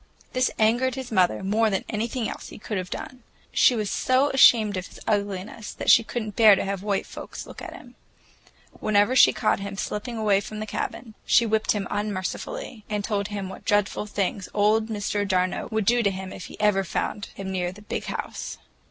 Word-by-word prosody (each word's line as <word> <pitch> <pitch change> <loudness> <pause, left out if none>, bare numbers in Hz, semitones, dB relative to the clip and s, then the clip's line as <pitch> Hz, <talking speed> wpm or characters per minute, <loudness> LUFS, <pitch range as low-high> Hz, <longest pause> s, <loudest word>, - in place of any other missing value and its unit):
This 255 0 +2
angered 240 +4 +2
his 260 -2 -6
mother 185 -2 +2
more 215 +3 +2
than 195 -2 -1
anything 225 +2 -2
else - - -7
he - - -10
could 210 -1 -3
have 185 0 -6
done; 255 -5 -7 0.3
she 250 - +5
was 210 -3 -2
so 260 +3 +2
ashamed 225 -6 +6
of 185 0 -4
his - - -14
ugliness 205 0 -2
that - - +3
she 230 - +7
could 235 +1 -3
n't 215 -1 -7
bear 215 -3 +8
to - - -2
have 195 -1 -3
white 200 -1 -1
folks - - -8
see - - -11 0.2
him. - - -12 0.9
Whenever 210 +4 +3
she - - +8
caught 215 - +1
him 200 0 -6
slipping 225 +4 -4
away 205 -3 +3
from 215 +1 -7
the 215 - -3
cabin, 220 +1 -5
she 235 - +4
whipped 220 -1 +1
him 205 -2 -3
unmercifully, 210 - -4
and 210 -1 -1
told 200 -1 -1
him 205 -2 -4
what 190 - -9
dreadful 205 0 +1
things 200 -1 -2
old 215 +2 +3
Mr. 205 -1 -1
d'Arnault 185 -1 0
would 220 -2 0
do 240 +3 +4
to 205 - +3
him 190 -1 -6
if - - -8
he - - -11
ever 205 -2 +3
found 200 +3 -3
him 190 -1 -5
near 180 -1 -1
the 205 +3 -14
"Big - - -4
House." - - -5
210 Hz, 205 wpm, -25 LUFS, 195-225 Hz, 0.9 s, bear